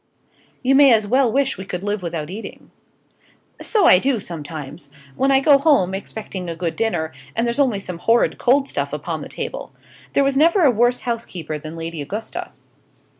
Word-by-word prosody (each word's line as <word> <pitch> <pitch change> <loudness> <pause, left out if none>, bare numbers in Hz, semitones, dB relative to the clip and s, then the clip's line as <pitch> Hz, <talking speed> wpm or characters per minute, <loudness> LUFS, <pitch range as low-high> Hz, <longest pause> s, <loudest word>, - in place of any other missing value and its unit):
"You 260 +2 +3
may 275 -1 +7
as 220 -2 +4
well 255 +2 +2
wish 270 -4 0
we - - -5
could 180 -1 -5
live 205 0 -2
without 165 -2 -4
eating." 215 +4 -9 0.9
"So 420 -5 +2
I 180 - +7
do, 260 +1 0
sometimes 150 -4 -7 0.3
when 270 - +1
I 270 -1 +5
go 280 0 +5
home, 275 - +3
expecting 195 -2 -6
a 165 - -4
good 165 0 -3
dinner, 175 -8 -1 0.2
and 230 - +1
there's 235 +3 -2
only 250 -8 +2
some 180 -3 -7
horrid 230 +5 +2
cold 275 +3 +3
stuff - - -3
upon - - -4
the - - -8
table. - - -6 0.4
There 275 - +3
never 330 +8 +3
was 310 - +6
a - - +5
worse 240 +3 +2
housekeeper 180 -10 -4
than 155 +2 -8
Lady 165 -1 -5
Augusta. 205 +10 -5
220 Hz, 185 wpm, -21 LUFS, 170-270 Hz, 0.9 s, may